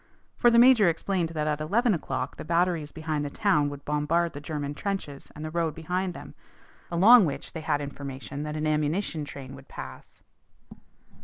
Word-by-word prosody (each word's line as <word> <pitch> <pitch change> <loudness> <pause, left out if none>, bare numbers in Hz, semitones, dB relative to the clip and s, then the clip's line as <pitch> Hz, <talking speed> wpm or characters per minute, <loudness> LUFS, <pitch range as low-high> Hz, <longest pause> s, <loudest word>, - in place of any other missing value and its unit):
For 240 - +4
the 235 - +4
major 235 -6 +7
explained 170 +1 -1
that 155 -2 -2
at 150 0 -1
eleven 215 +9 +2
o'clock 130 -5 -3
the - - -6
batteries 170 -2 0
behind 155 -2 -3
the 145 - -3
town 150 -4 +2
would 145 -1 -9
bombard 150 +3 0
the 145 - -7
German 145 -2 -4
trenches 170 -5 -5
and 150 +1 -6
the 155 - -5
road 165 -2 -1
behind 180 +2 -2
them, - - -10 0.6
along 200 +6 +7
which 140 -1 -6
they 160 - -5
had 145 -2 0
information 140 0 -6
that 150 +1 -4
an 155 - -2
ammunition 155 +2 0
train 135 -2 -9
would 135 0 -13
pass. - - -10
155 Hz, 180 wpm, -27 LUFS, 145-180 Hz, 0.6 s, major